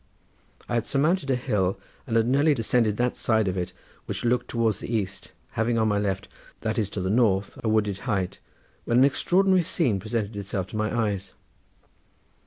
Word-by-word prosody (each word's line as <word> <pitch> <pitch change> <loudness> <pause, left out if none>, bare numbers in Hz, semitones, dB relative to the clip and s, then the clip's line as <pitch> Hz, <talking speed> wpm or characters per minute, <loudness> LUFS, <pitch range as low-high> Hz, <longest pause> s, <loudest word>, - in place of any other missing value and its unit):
I - - -4
had 115 -1 0
surmounted 150 +2 +1
a 130 - +3
hill 100 -6 0 0.3
and 115 - -1
had 115 - +3
nearly 140 +4 +3
descended 115 -2 +1
that 125 0 +1
side 110 -3 +1
of 95 - -1
it 90 -2 -3 0.4
which - - -3
looked 120 +1 +1
towards 115 -4 +1
the - - -6
east, 100 -4 -3 0.2
having 115 +1 0
on 110 -1 +2
my 105 0 +1
left, 95 -2 -2 0.3
that 110 +1 -1
is 105 -3 0
to - - 0
the 95 - -1
north, 105 -4 +2
a 110 - +1
wooded 105 -3 +1
height, 100 -2 -1 0.5
when 120 - +2
an 130 - +7
extraordinary 185 +6 +3
scene 155 - +1
presented 110 +1 -3
itself 100 -2 -3
to - - -8
my 110 0 0 0.2
eyes. 100 -1 -6
110 Hz, 190 wpm, -26 LUFS, 100-125 Hz, 0.5 s, an